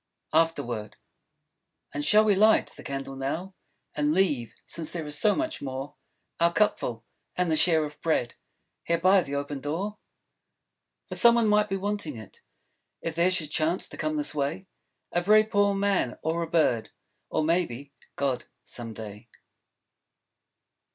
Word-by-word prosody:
After 165 +1 +3
Word 115 -3 -5 1.0
And 145 - -2
shall 210 +8 +5
we 210 - +5
light 215 +3 +4
the - - -13
candle 135 0 -5
now? 160 +8 -3 0.4
And 150 +1 +1
leave, 145 - +1
since 165 -2 -5
there 165 -3 -4
is 150 0 -4
so 210 +7 +3
much 320 0 -2
more, 135 +1 -5 0.5
Our 170 0 +4
cupful, 125 - 0 0.3
and 180 -2 +1
the - - +3
share 160 -1 +4
of 150 0 -10
bread, 155 -7 0 0.5
Here 170 - +1
by 185 +3 +5
the 140 -4 -5
open 140 0 -3
door? 175 +10 -3 1.1
For - - -6
some 235 0 +6
one 230 -2 +3
might 210 0 +3
be 195 - -1
wanting 200 - -3
it, 110 -3 -12 0.6
If 165 - -3
there 170 +3 +3
should 160 -5 -1
chance 160 +4 0
to - - -9
come 155 0 -1
this 150 0 0
way, 150 +6 -2 0.5
A 175 - +1
very 215 +4 +6
poor 205 -2 +2
Man; 195 -10 +1
or 165 +2 0
a 165 - -3
Bird; 155 -9 +2 0.4
Or - - 0
maybe, 145 -5 -1 0.2
God, 130 -3 -1 0.2
some 115 -2 -4
day. 105 +1 -9
160 Hz, 160 wpm, -27 LUFS, 140-190 Hz, 1.1 s, some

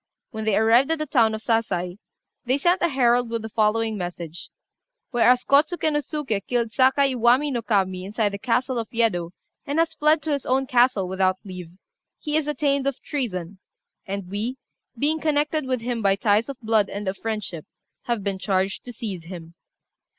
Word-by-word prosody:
When 220 -1 -5
they 215 -2 +2
arrived 230 +5 +4
at 325 - +1
the 305 - -2
town 230 -6 +3
of 220 - -8
Sasai, 190 -5 -1 0.4
they 255 +1 +1
sent 350 +6 +2
a 345 - +4
herald 245 -3 +2
with 230 -1 -3
the 220 - -5
following 220 0 +1
message 175 -2 -6 0.6
"Whereas 245 0 +4
Kôtsuké 310 +2 +3
no 295 - +2
Suké 285 -8 -3
killed 235 -2 0
Sakai 265 +2 +3
Iwami 250 +4 +3
no 240 -3 -1
Kami 190 -5 0
inside 210 +1 0
the 200 0 -6
castle 250 +2 0
of 225 - -5
Yedo, 215 -8 0 0.4
and 285 +2 -2
has 325 0 +2
fled 305 -1 +2
to 310 - -2
his 280 -2 -1
own 265 +1 +1
castle 245 -6 +3
without 185 0 +1
leave, 180 -2 -9 0.4
he 300 0 -3
is 310 -1 +1
attainted 280 -1 0
of 275 - -8
treason; 195 - -4 0.5
and 195 -1 -4
we, 215 +7 -3 0.4
being 305 +5 +1
connected 300 -1 0
with 255 -2 -1
him 240 -1 -2
by 195 -2 +3
ties 210 +4 +2
of 275 - -6
blood 220 -2 +2
and 200 0 -5
of 190 - -1
friendship, 210 -7 -5 0.4
have 235 -4 -1
been 195 -1 -2
charged 190 0 -1
to 245 - -7
seize 205 -8 -6
him." 170 -2 -9
230 Hz, 185 wpm, -24 LUFS, 200-270 Hz, 0.6 s, arrived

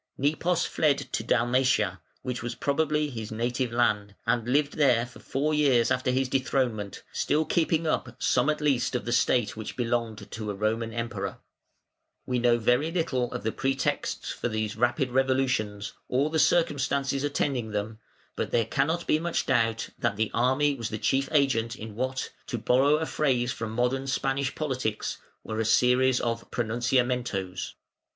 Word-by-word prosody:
Nepos 160 +5 +1
fled 145 -3 +2
to - - -4
Dalmatia, 120 -6 +2 0.2
which 125 -2 -3
was 120 0 -4
probably 150 0 0
his 110 -3 -6
native 120 +2 -1
land, 105 -4 +1
and 120 0 +1
lived 145 +2 +2
there 125 -6 +4
for 125 - -14
four 150 +3 -1
years 135 -6 +3
after 130 0 +1
his 130 +1 +1
dethronement, 125 -6 -1
still 155 +1 +1
keeping 165 0 +1
up 125 -6 -1
some 125 +4 +2
at 150 0 0
least 135 -4 +1
of 125 - -2
the 120 - -2
state 120 -1 +2
which 110 0 -6
belonged 115 -4 -2
to 110 -2 -5
a 100 - -3
Roman 110 +3 -1
Emperor. 115 -4 -4 0.9
We 125 -1 0
know 120 0 +4
very 125 +7 +2
little 130 -8 -1
of 125 - -5
the 110 - 0
pretexts 135 +1 -1
for 120 - -3
these 110 -1 -2
rapid 120 +3 +1
revolutions, 130 -6 0
or 140 +4 +1
the 160 - +1
circumstances 140 -4 +2
attending 140 -5 -1
them, 105 +1 -3 0.4
but - - -2
there 115 -1 +2
cannot 160 +9 0
be 155 - +2
much 170 +1 -1
doubt 115 -3 +1
that 100 - 0
the 110 +1 -1
army 130 +5 +2
was 115 -5 -4
the 110 - -3
chief 135 +5 +1
agent 125 -6 +2
in 110 -2 -8
what, 130 +4 -3 0.2
to 120 - -2
borrow 130 +6 +3
a 160 +1 -1
phrase 130 -6 +1
from 115 -3 -4
modern 125 +4 0
Spanish 135 +1 -1
politics, 130 -8 -2 0.2
were 110 0 -4
a - - +2
series 125 +3 +4
of 115 -1 -3
pronunciamentos. 120 -5 -1
125 Hz, 165 wpm, -27 LUFS, 115-135 Hz, 0.9 s, there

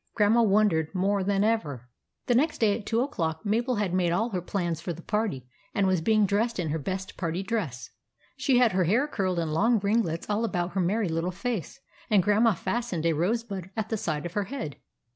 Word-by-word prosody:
Grandma 220 +2 +4
wondered 200 -6 +2
more 195 +1 +1
than 200 +1 +1
ever. 150 - -1 0.4
The 245 - +2
next 300 +6 +2
day 210 -3 +3
at 210 -2 -8
two 230 +1 +1
o'clock, 165 - -2
Mabel 235 +5 +1
had 205 -4 -1
made 180 -2 +2
all 220 +7 +1
her 185 -3 -2
plans 175 -3 -2
for 175 - -3
the 170 +1 -11
party, 210 - -2 0.3
and 200 - +2
was 185 -3 +2
being 215 +4 +3
dressed 220 +4 0
in 170 -4 -1
her 160 +2 -1
best 190 +5 -5
party 170 +1 -2
dress. 185 - -3 0.4
She 265 -3 +2
had 245 -3 +5
her 185 -1 +2
hair 235 - +2
curled 190 -10 -1
in 165 -2 -1
long 225 +9 +3
ringlets 200 -5 0
all 210 +2 0
about 180 -5 -1
her 195 - 0
merry 200 +4 +1
little 165 +2 -1
face, 230 +4 -4 0.3
and 205 -5 +4
Grandma 210 +2 +3
fastened 215 -4 -2
a 165 - +3
rose 195 +10 0
bud 195 -5 -6
at 220 0 -2
the 225 - 0
side 155 -6 -2
of 175 - -5
her 205 -1 0
head. 190 - -5
200 Hz, 220 wpm, -27 LUFS, 170-225 Hz, 0.4 s, had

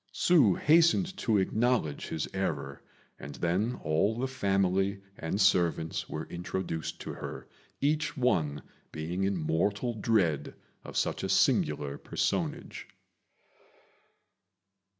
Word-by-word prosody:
Hsü 140 - +4
hastened 170 +4 +4
to 115 - +1
acknowledge 110 - 0
his 80 - -3
error, 70 0 -3 0.4
and 70 -1 -8
then 95 +8 0
all 80 +9 +1
the 130 +2 -1
family 100 -5 +1 0.2
and 80 +4 -3
servants 85 -5 +2
were 80 +1 -4
introduced 85 -2 -4
to - - -5
her, - - -7 0.3
each 150 +2 0
one 80 - +1 0.3
being 85 +5 -2
in 100 -1 0
mortal 100 +9 0
dread 95 -10 0 0.3
of - - -7
such - - 0
a - - -3
singular 70 -2 +2
personage. - - -2
95 Hz, 110 wpm, -30 LUFS, 80-120 Hz, 0.4 s, Hsü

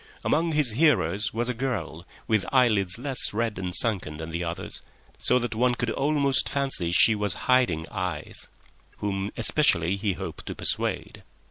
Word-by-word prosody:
Among 165 +1 +1
his 150 -6 +5
hearers 105 - +2
was 120 +2 -2
a 125 - -1
girl, 100 -9 -4 0.2
with 110 -3 +2
eyelids 110 -8 +3
less 130 0 +1
red 110 -2 -2
and 90 -1 -3
sunken 95 -10 +1
than 80 +1 -7
the 85 +2 -3
others, 85 0 -4 0.4
so 125 - +3
that 120 -2 -2
one 120 +2 +1
could 120 -1 -2
almost 140 0 +1
fancy 135 -12 0
she 110 +5 +5
was 105 -3 0
hiding 125 -12 +2
eyes, 90 -4 -4 0.5
whom 100 -1 -2
especially 95 - +2
he 100 0 -1
hoped - - -8
to - - -5
persuade. - - -2
110 Hz, 160 wpm, -26 LUFS, 90-125 Hz, 0.5 s, his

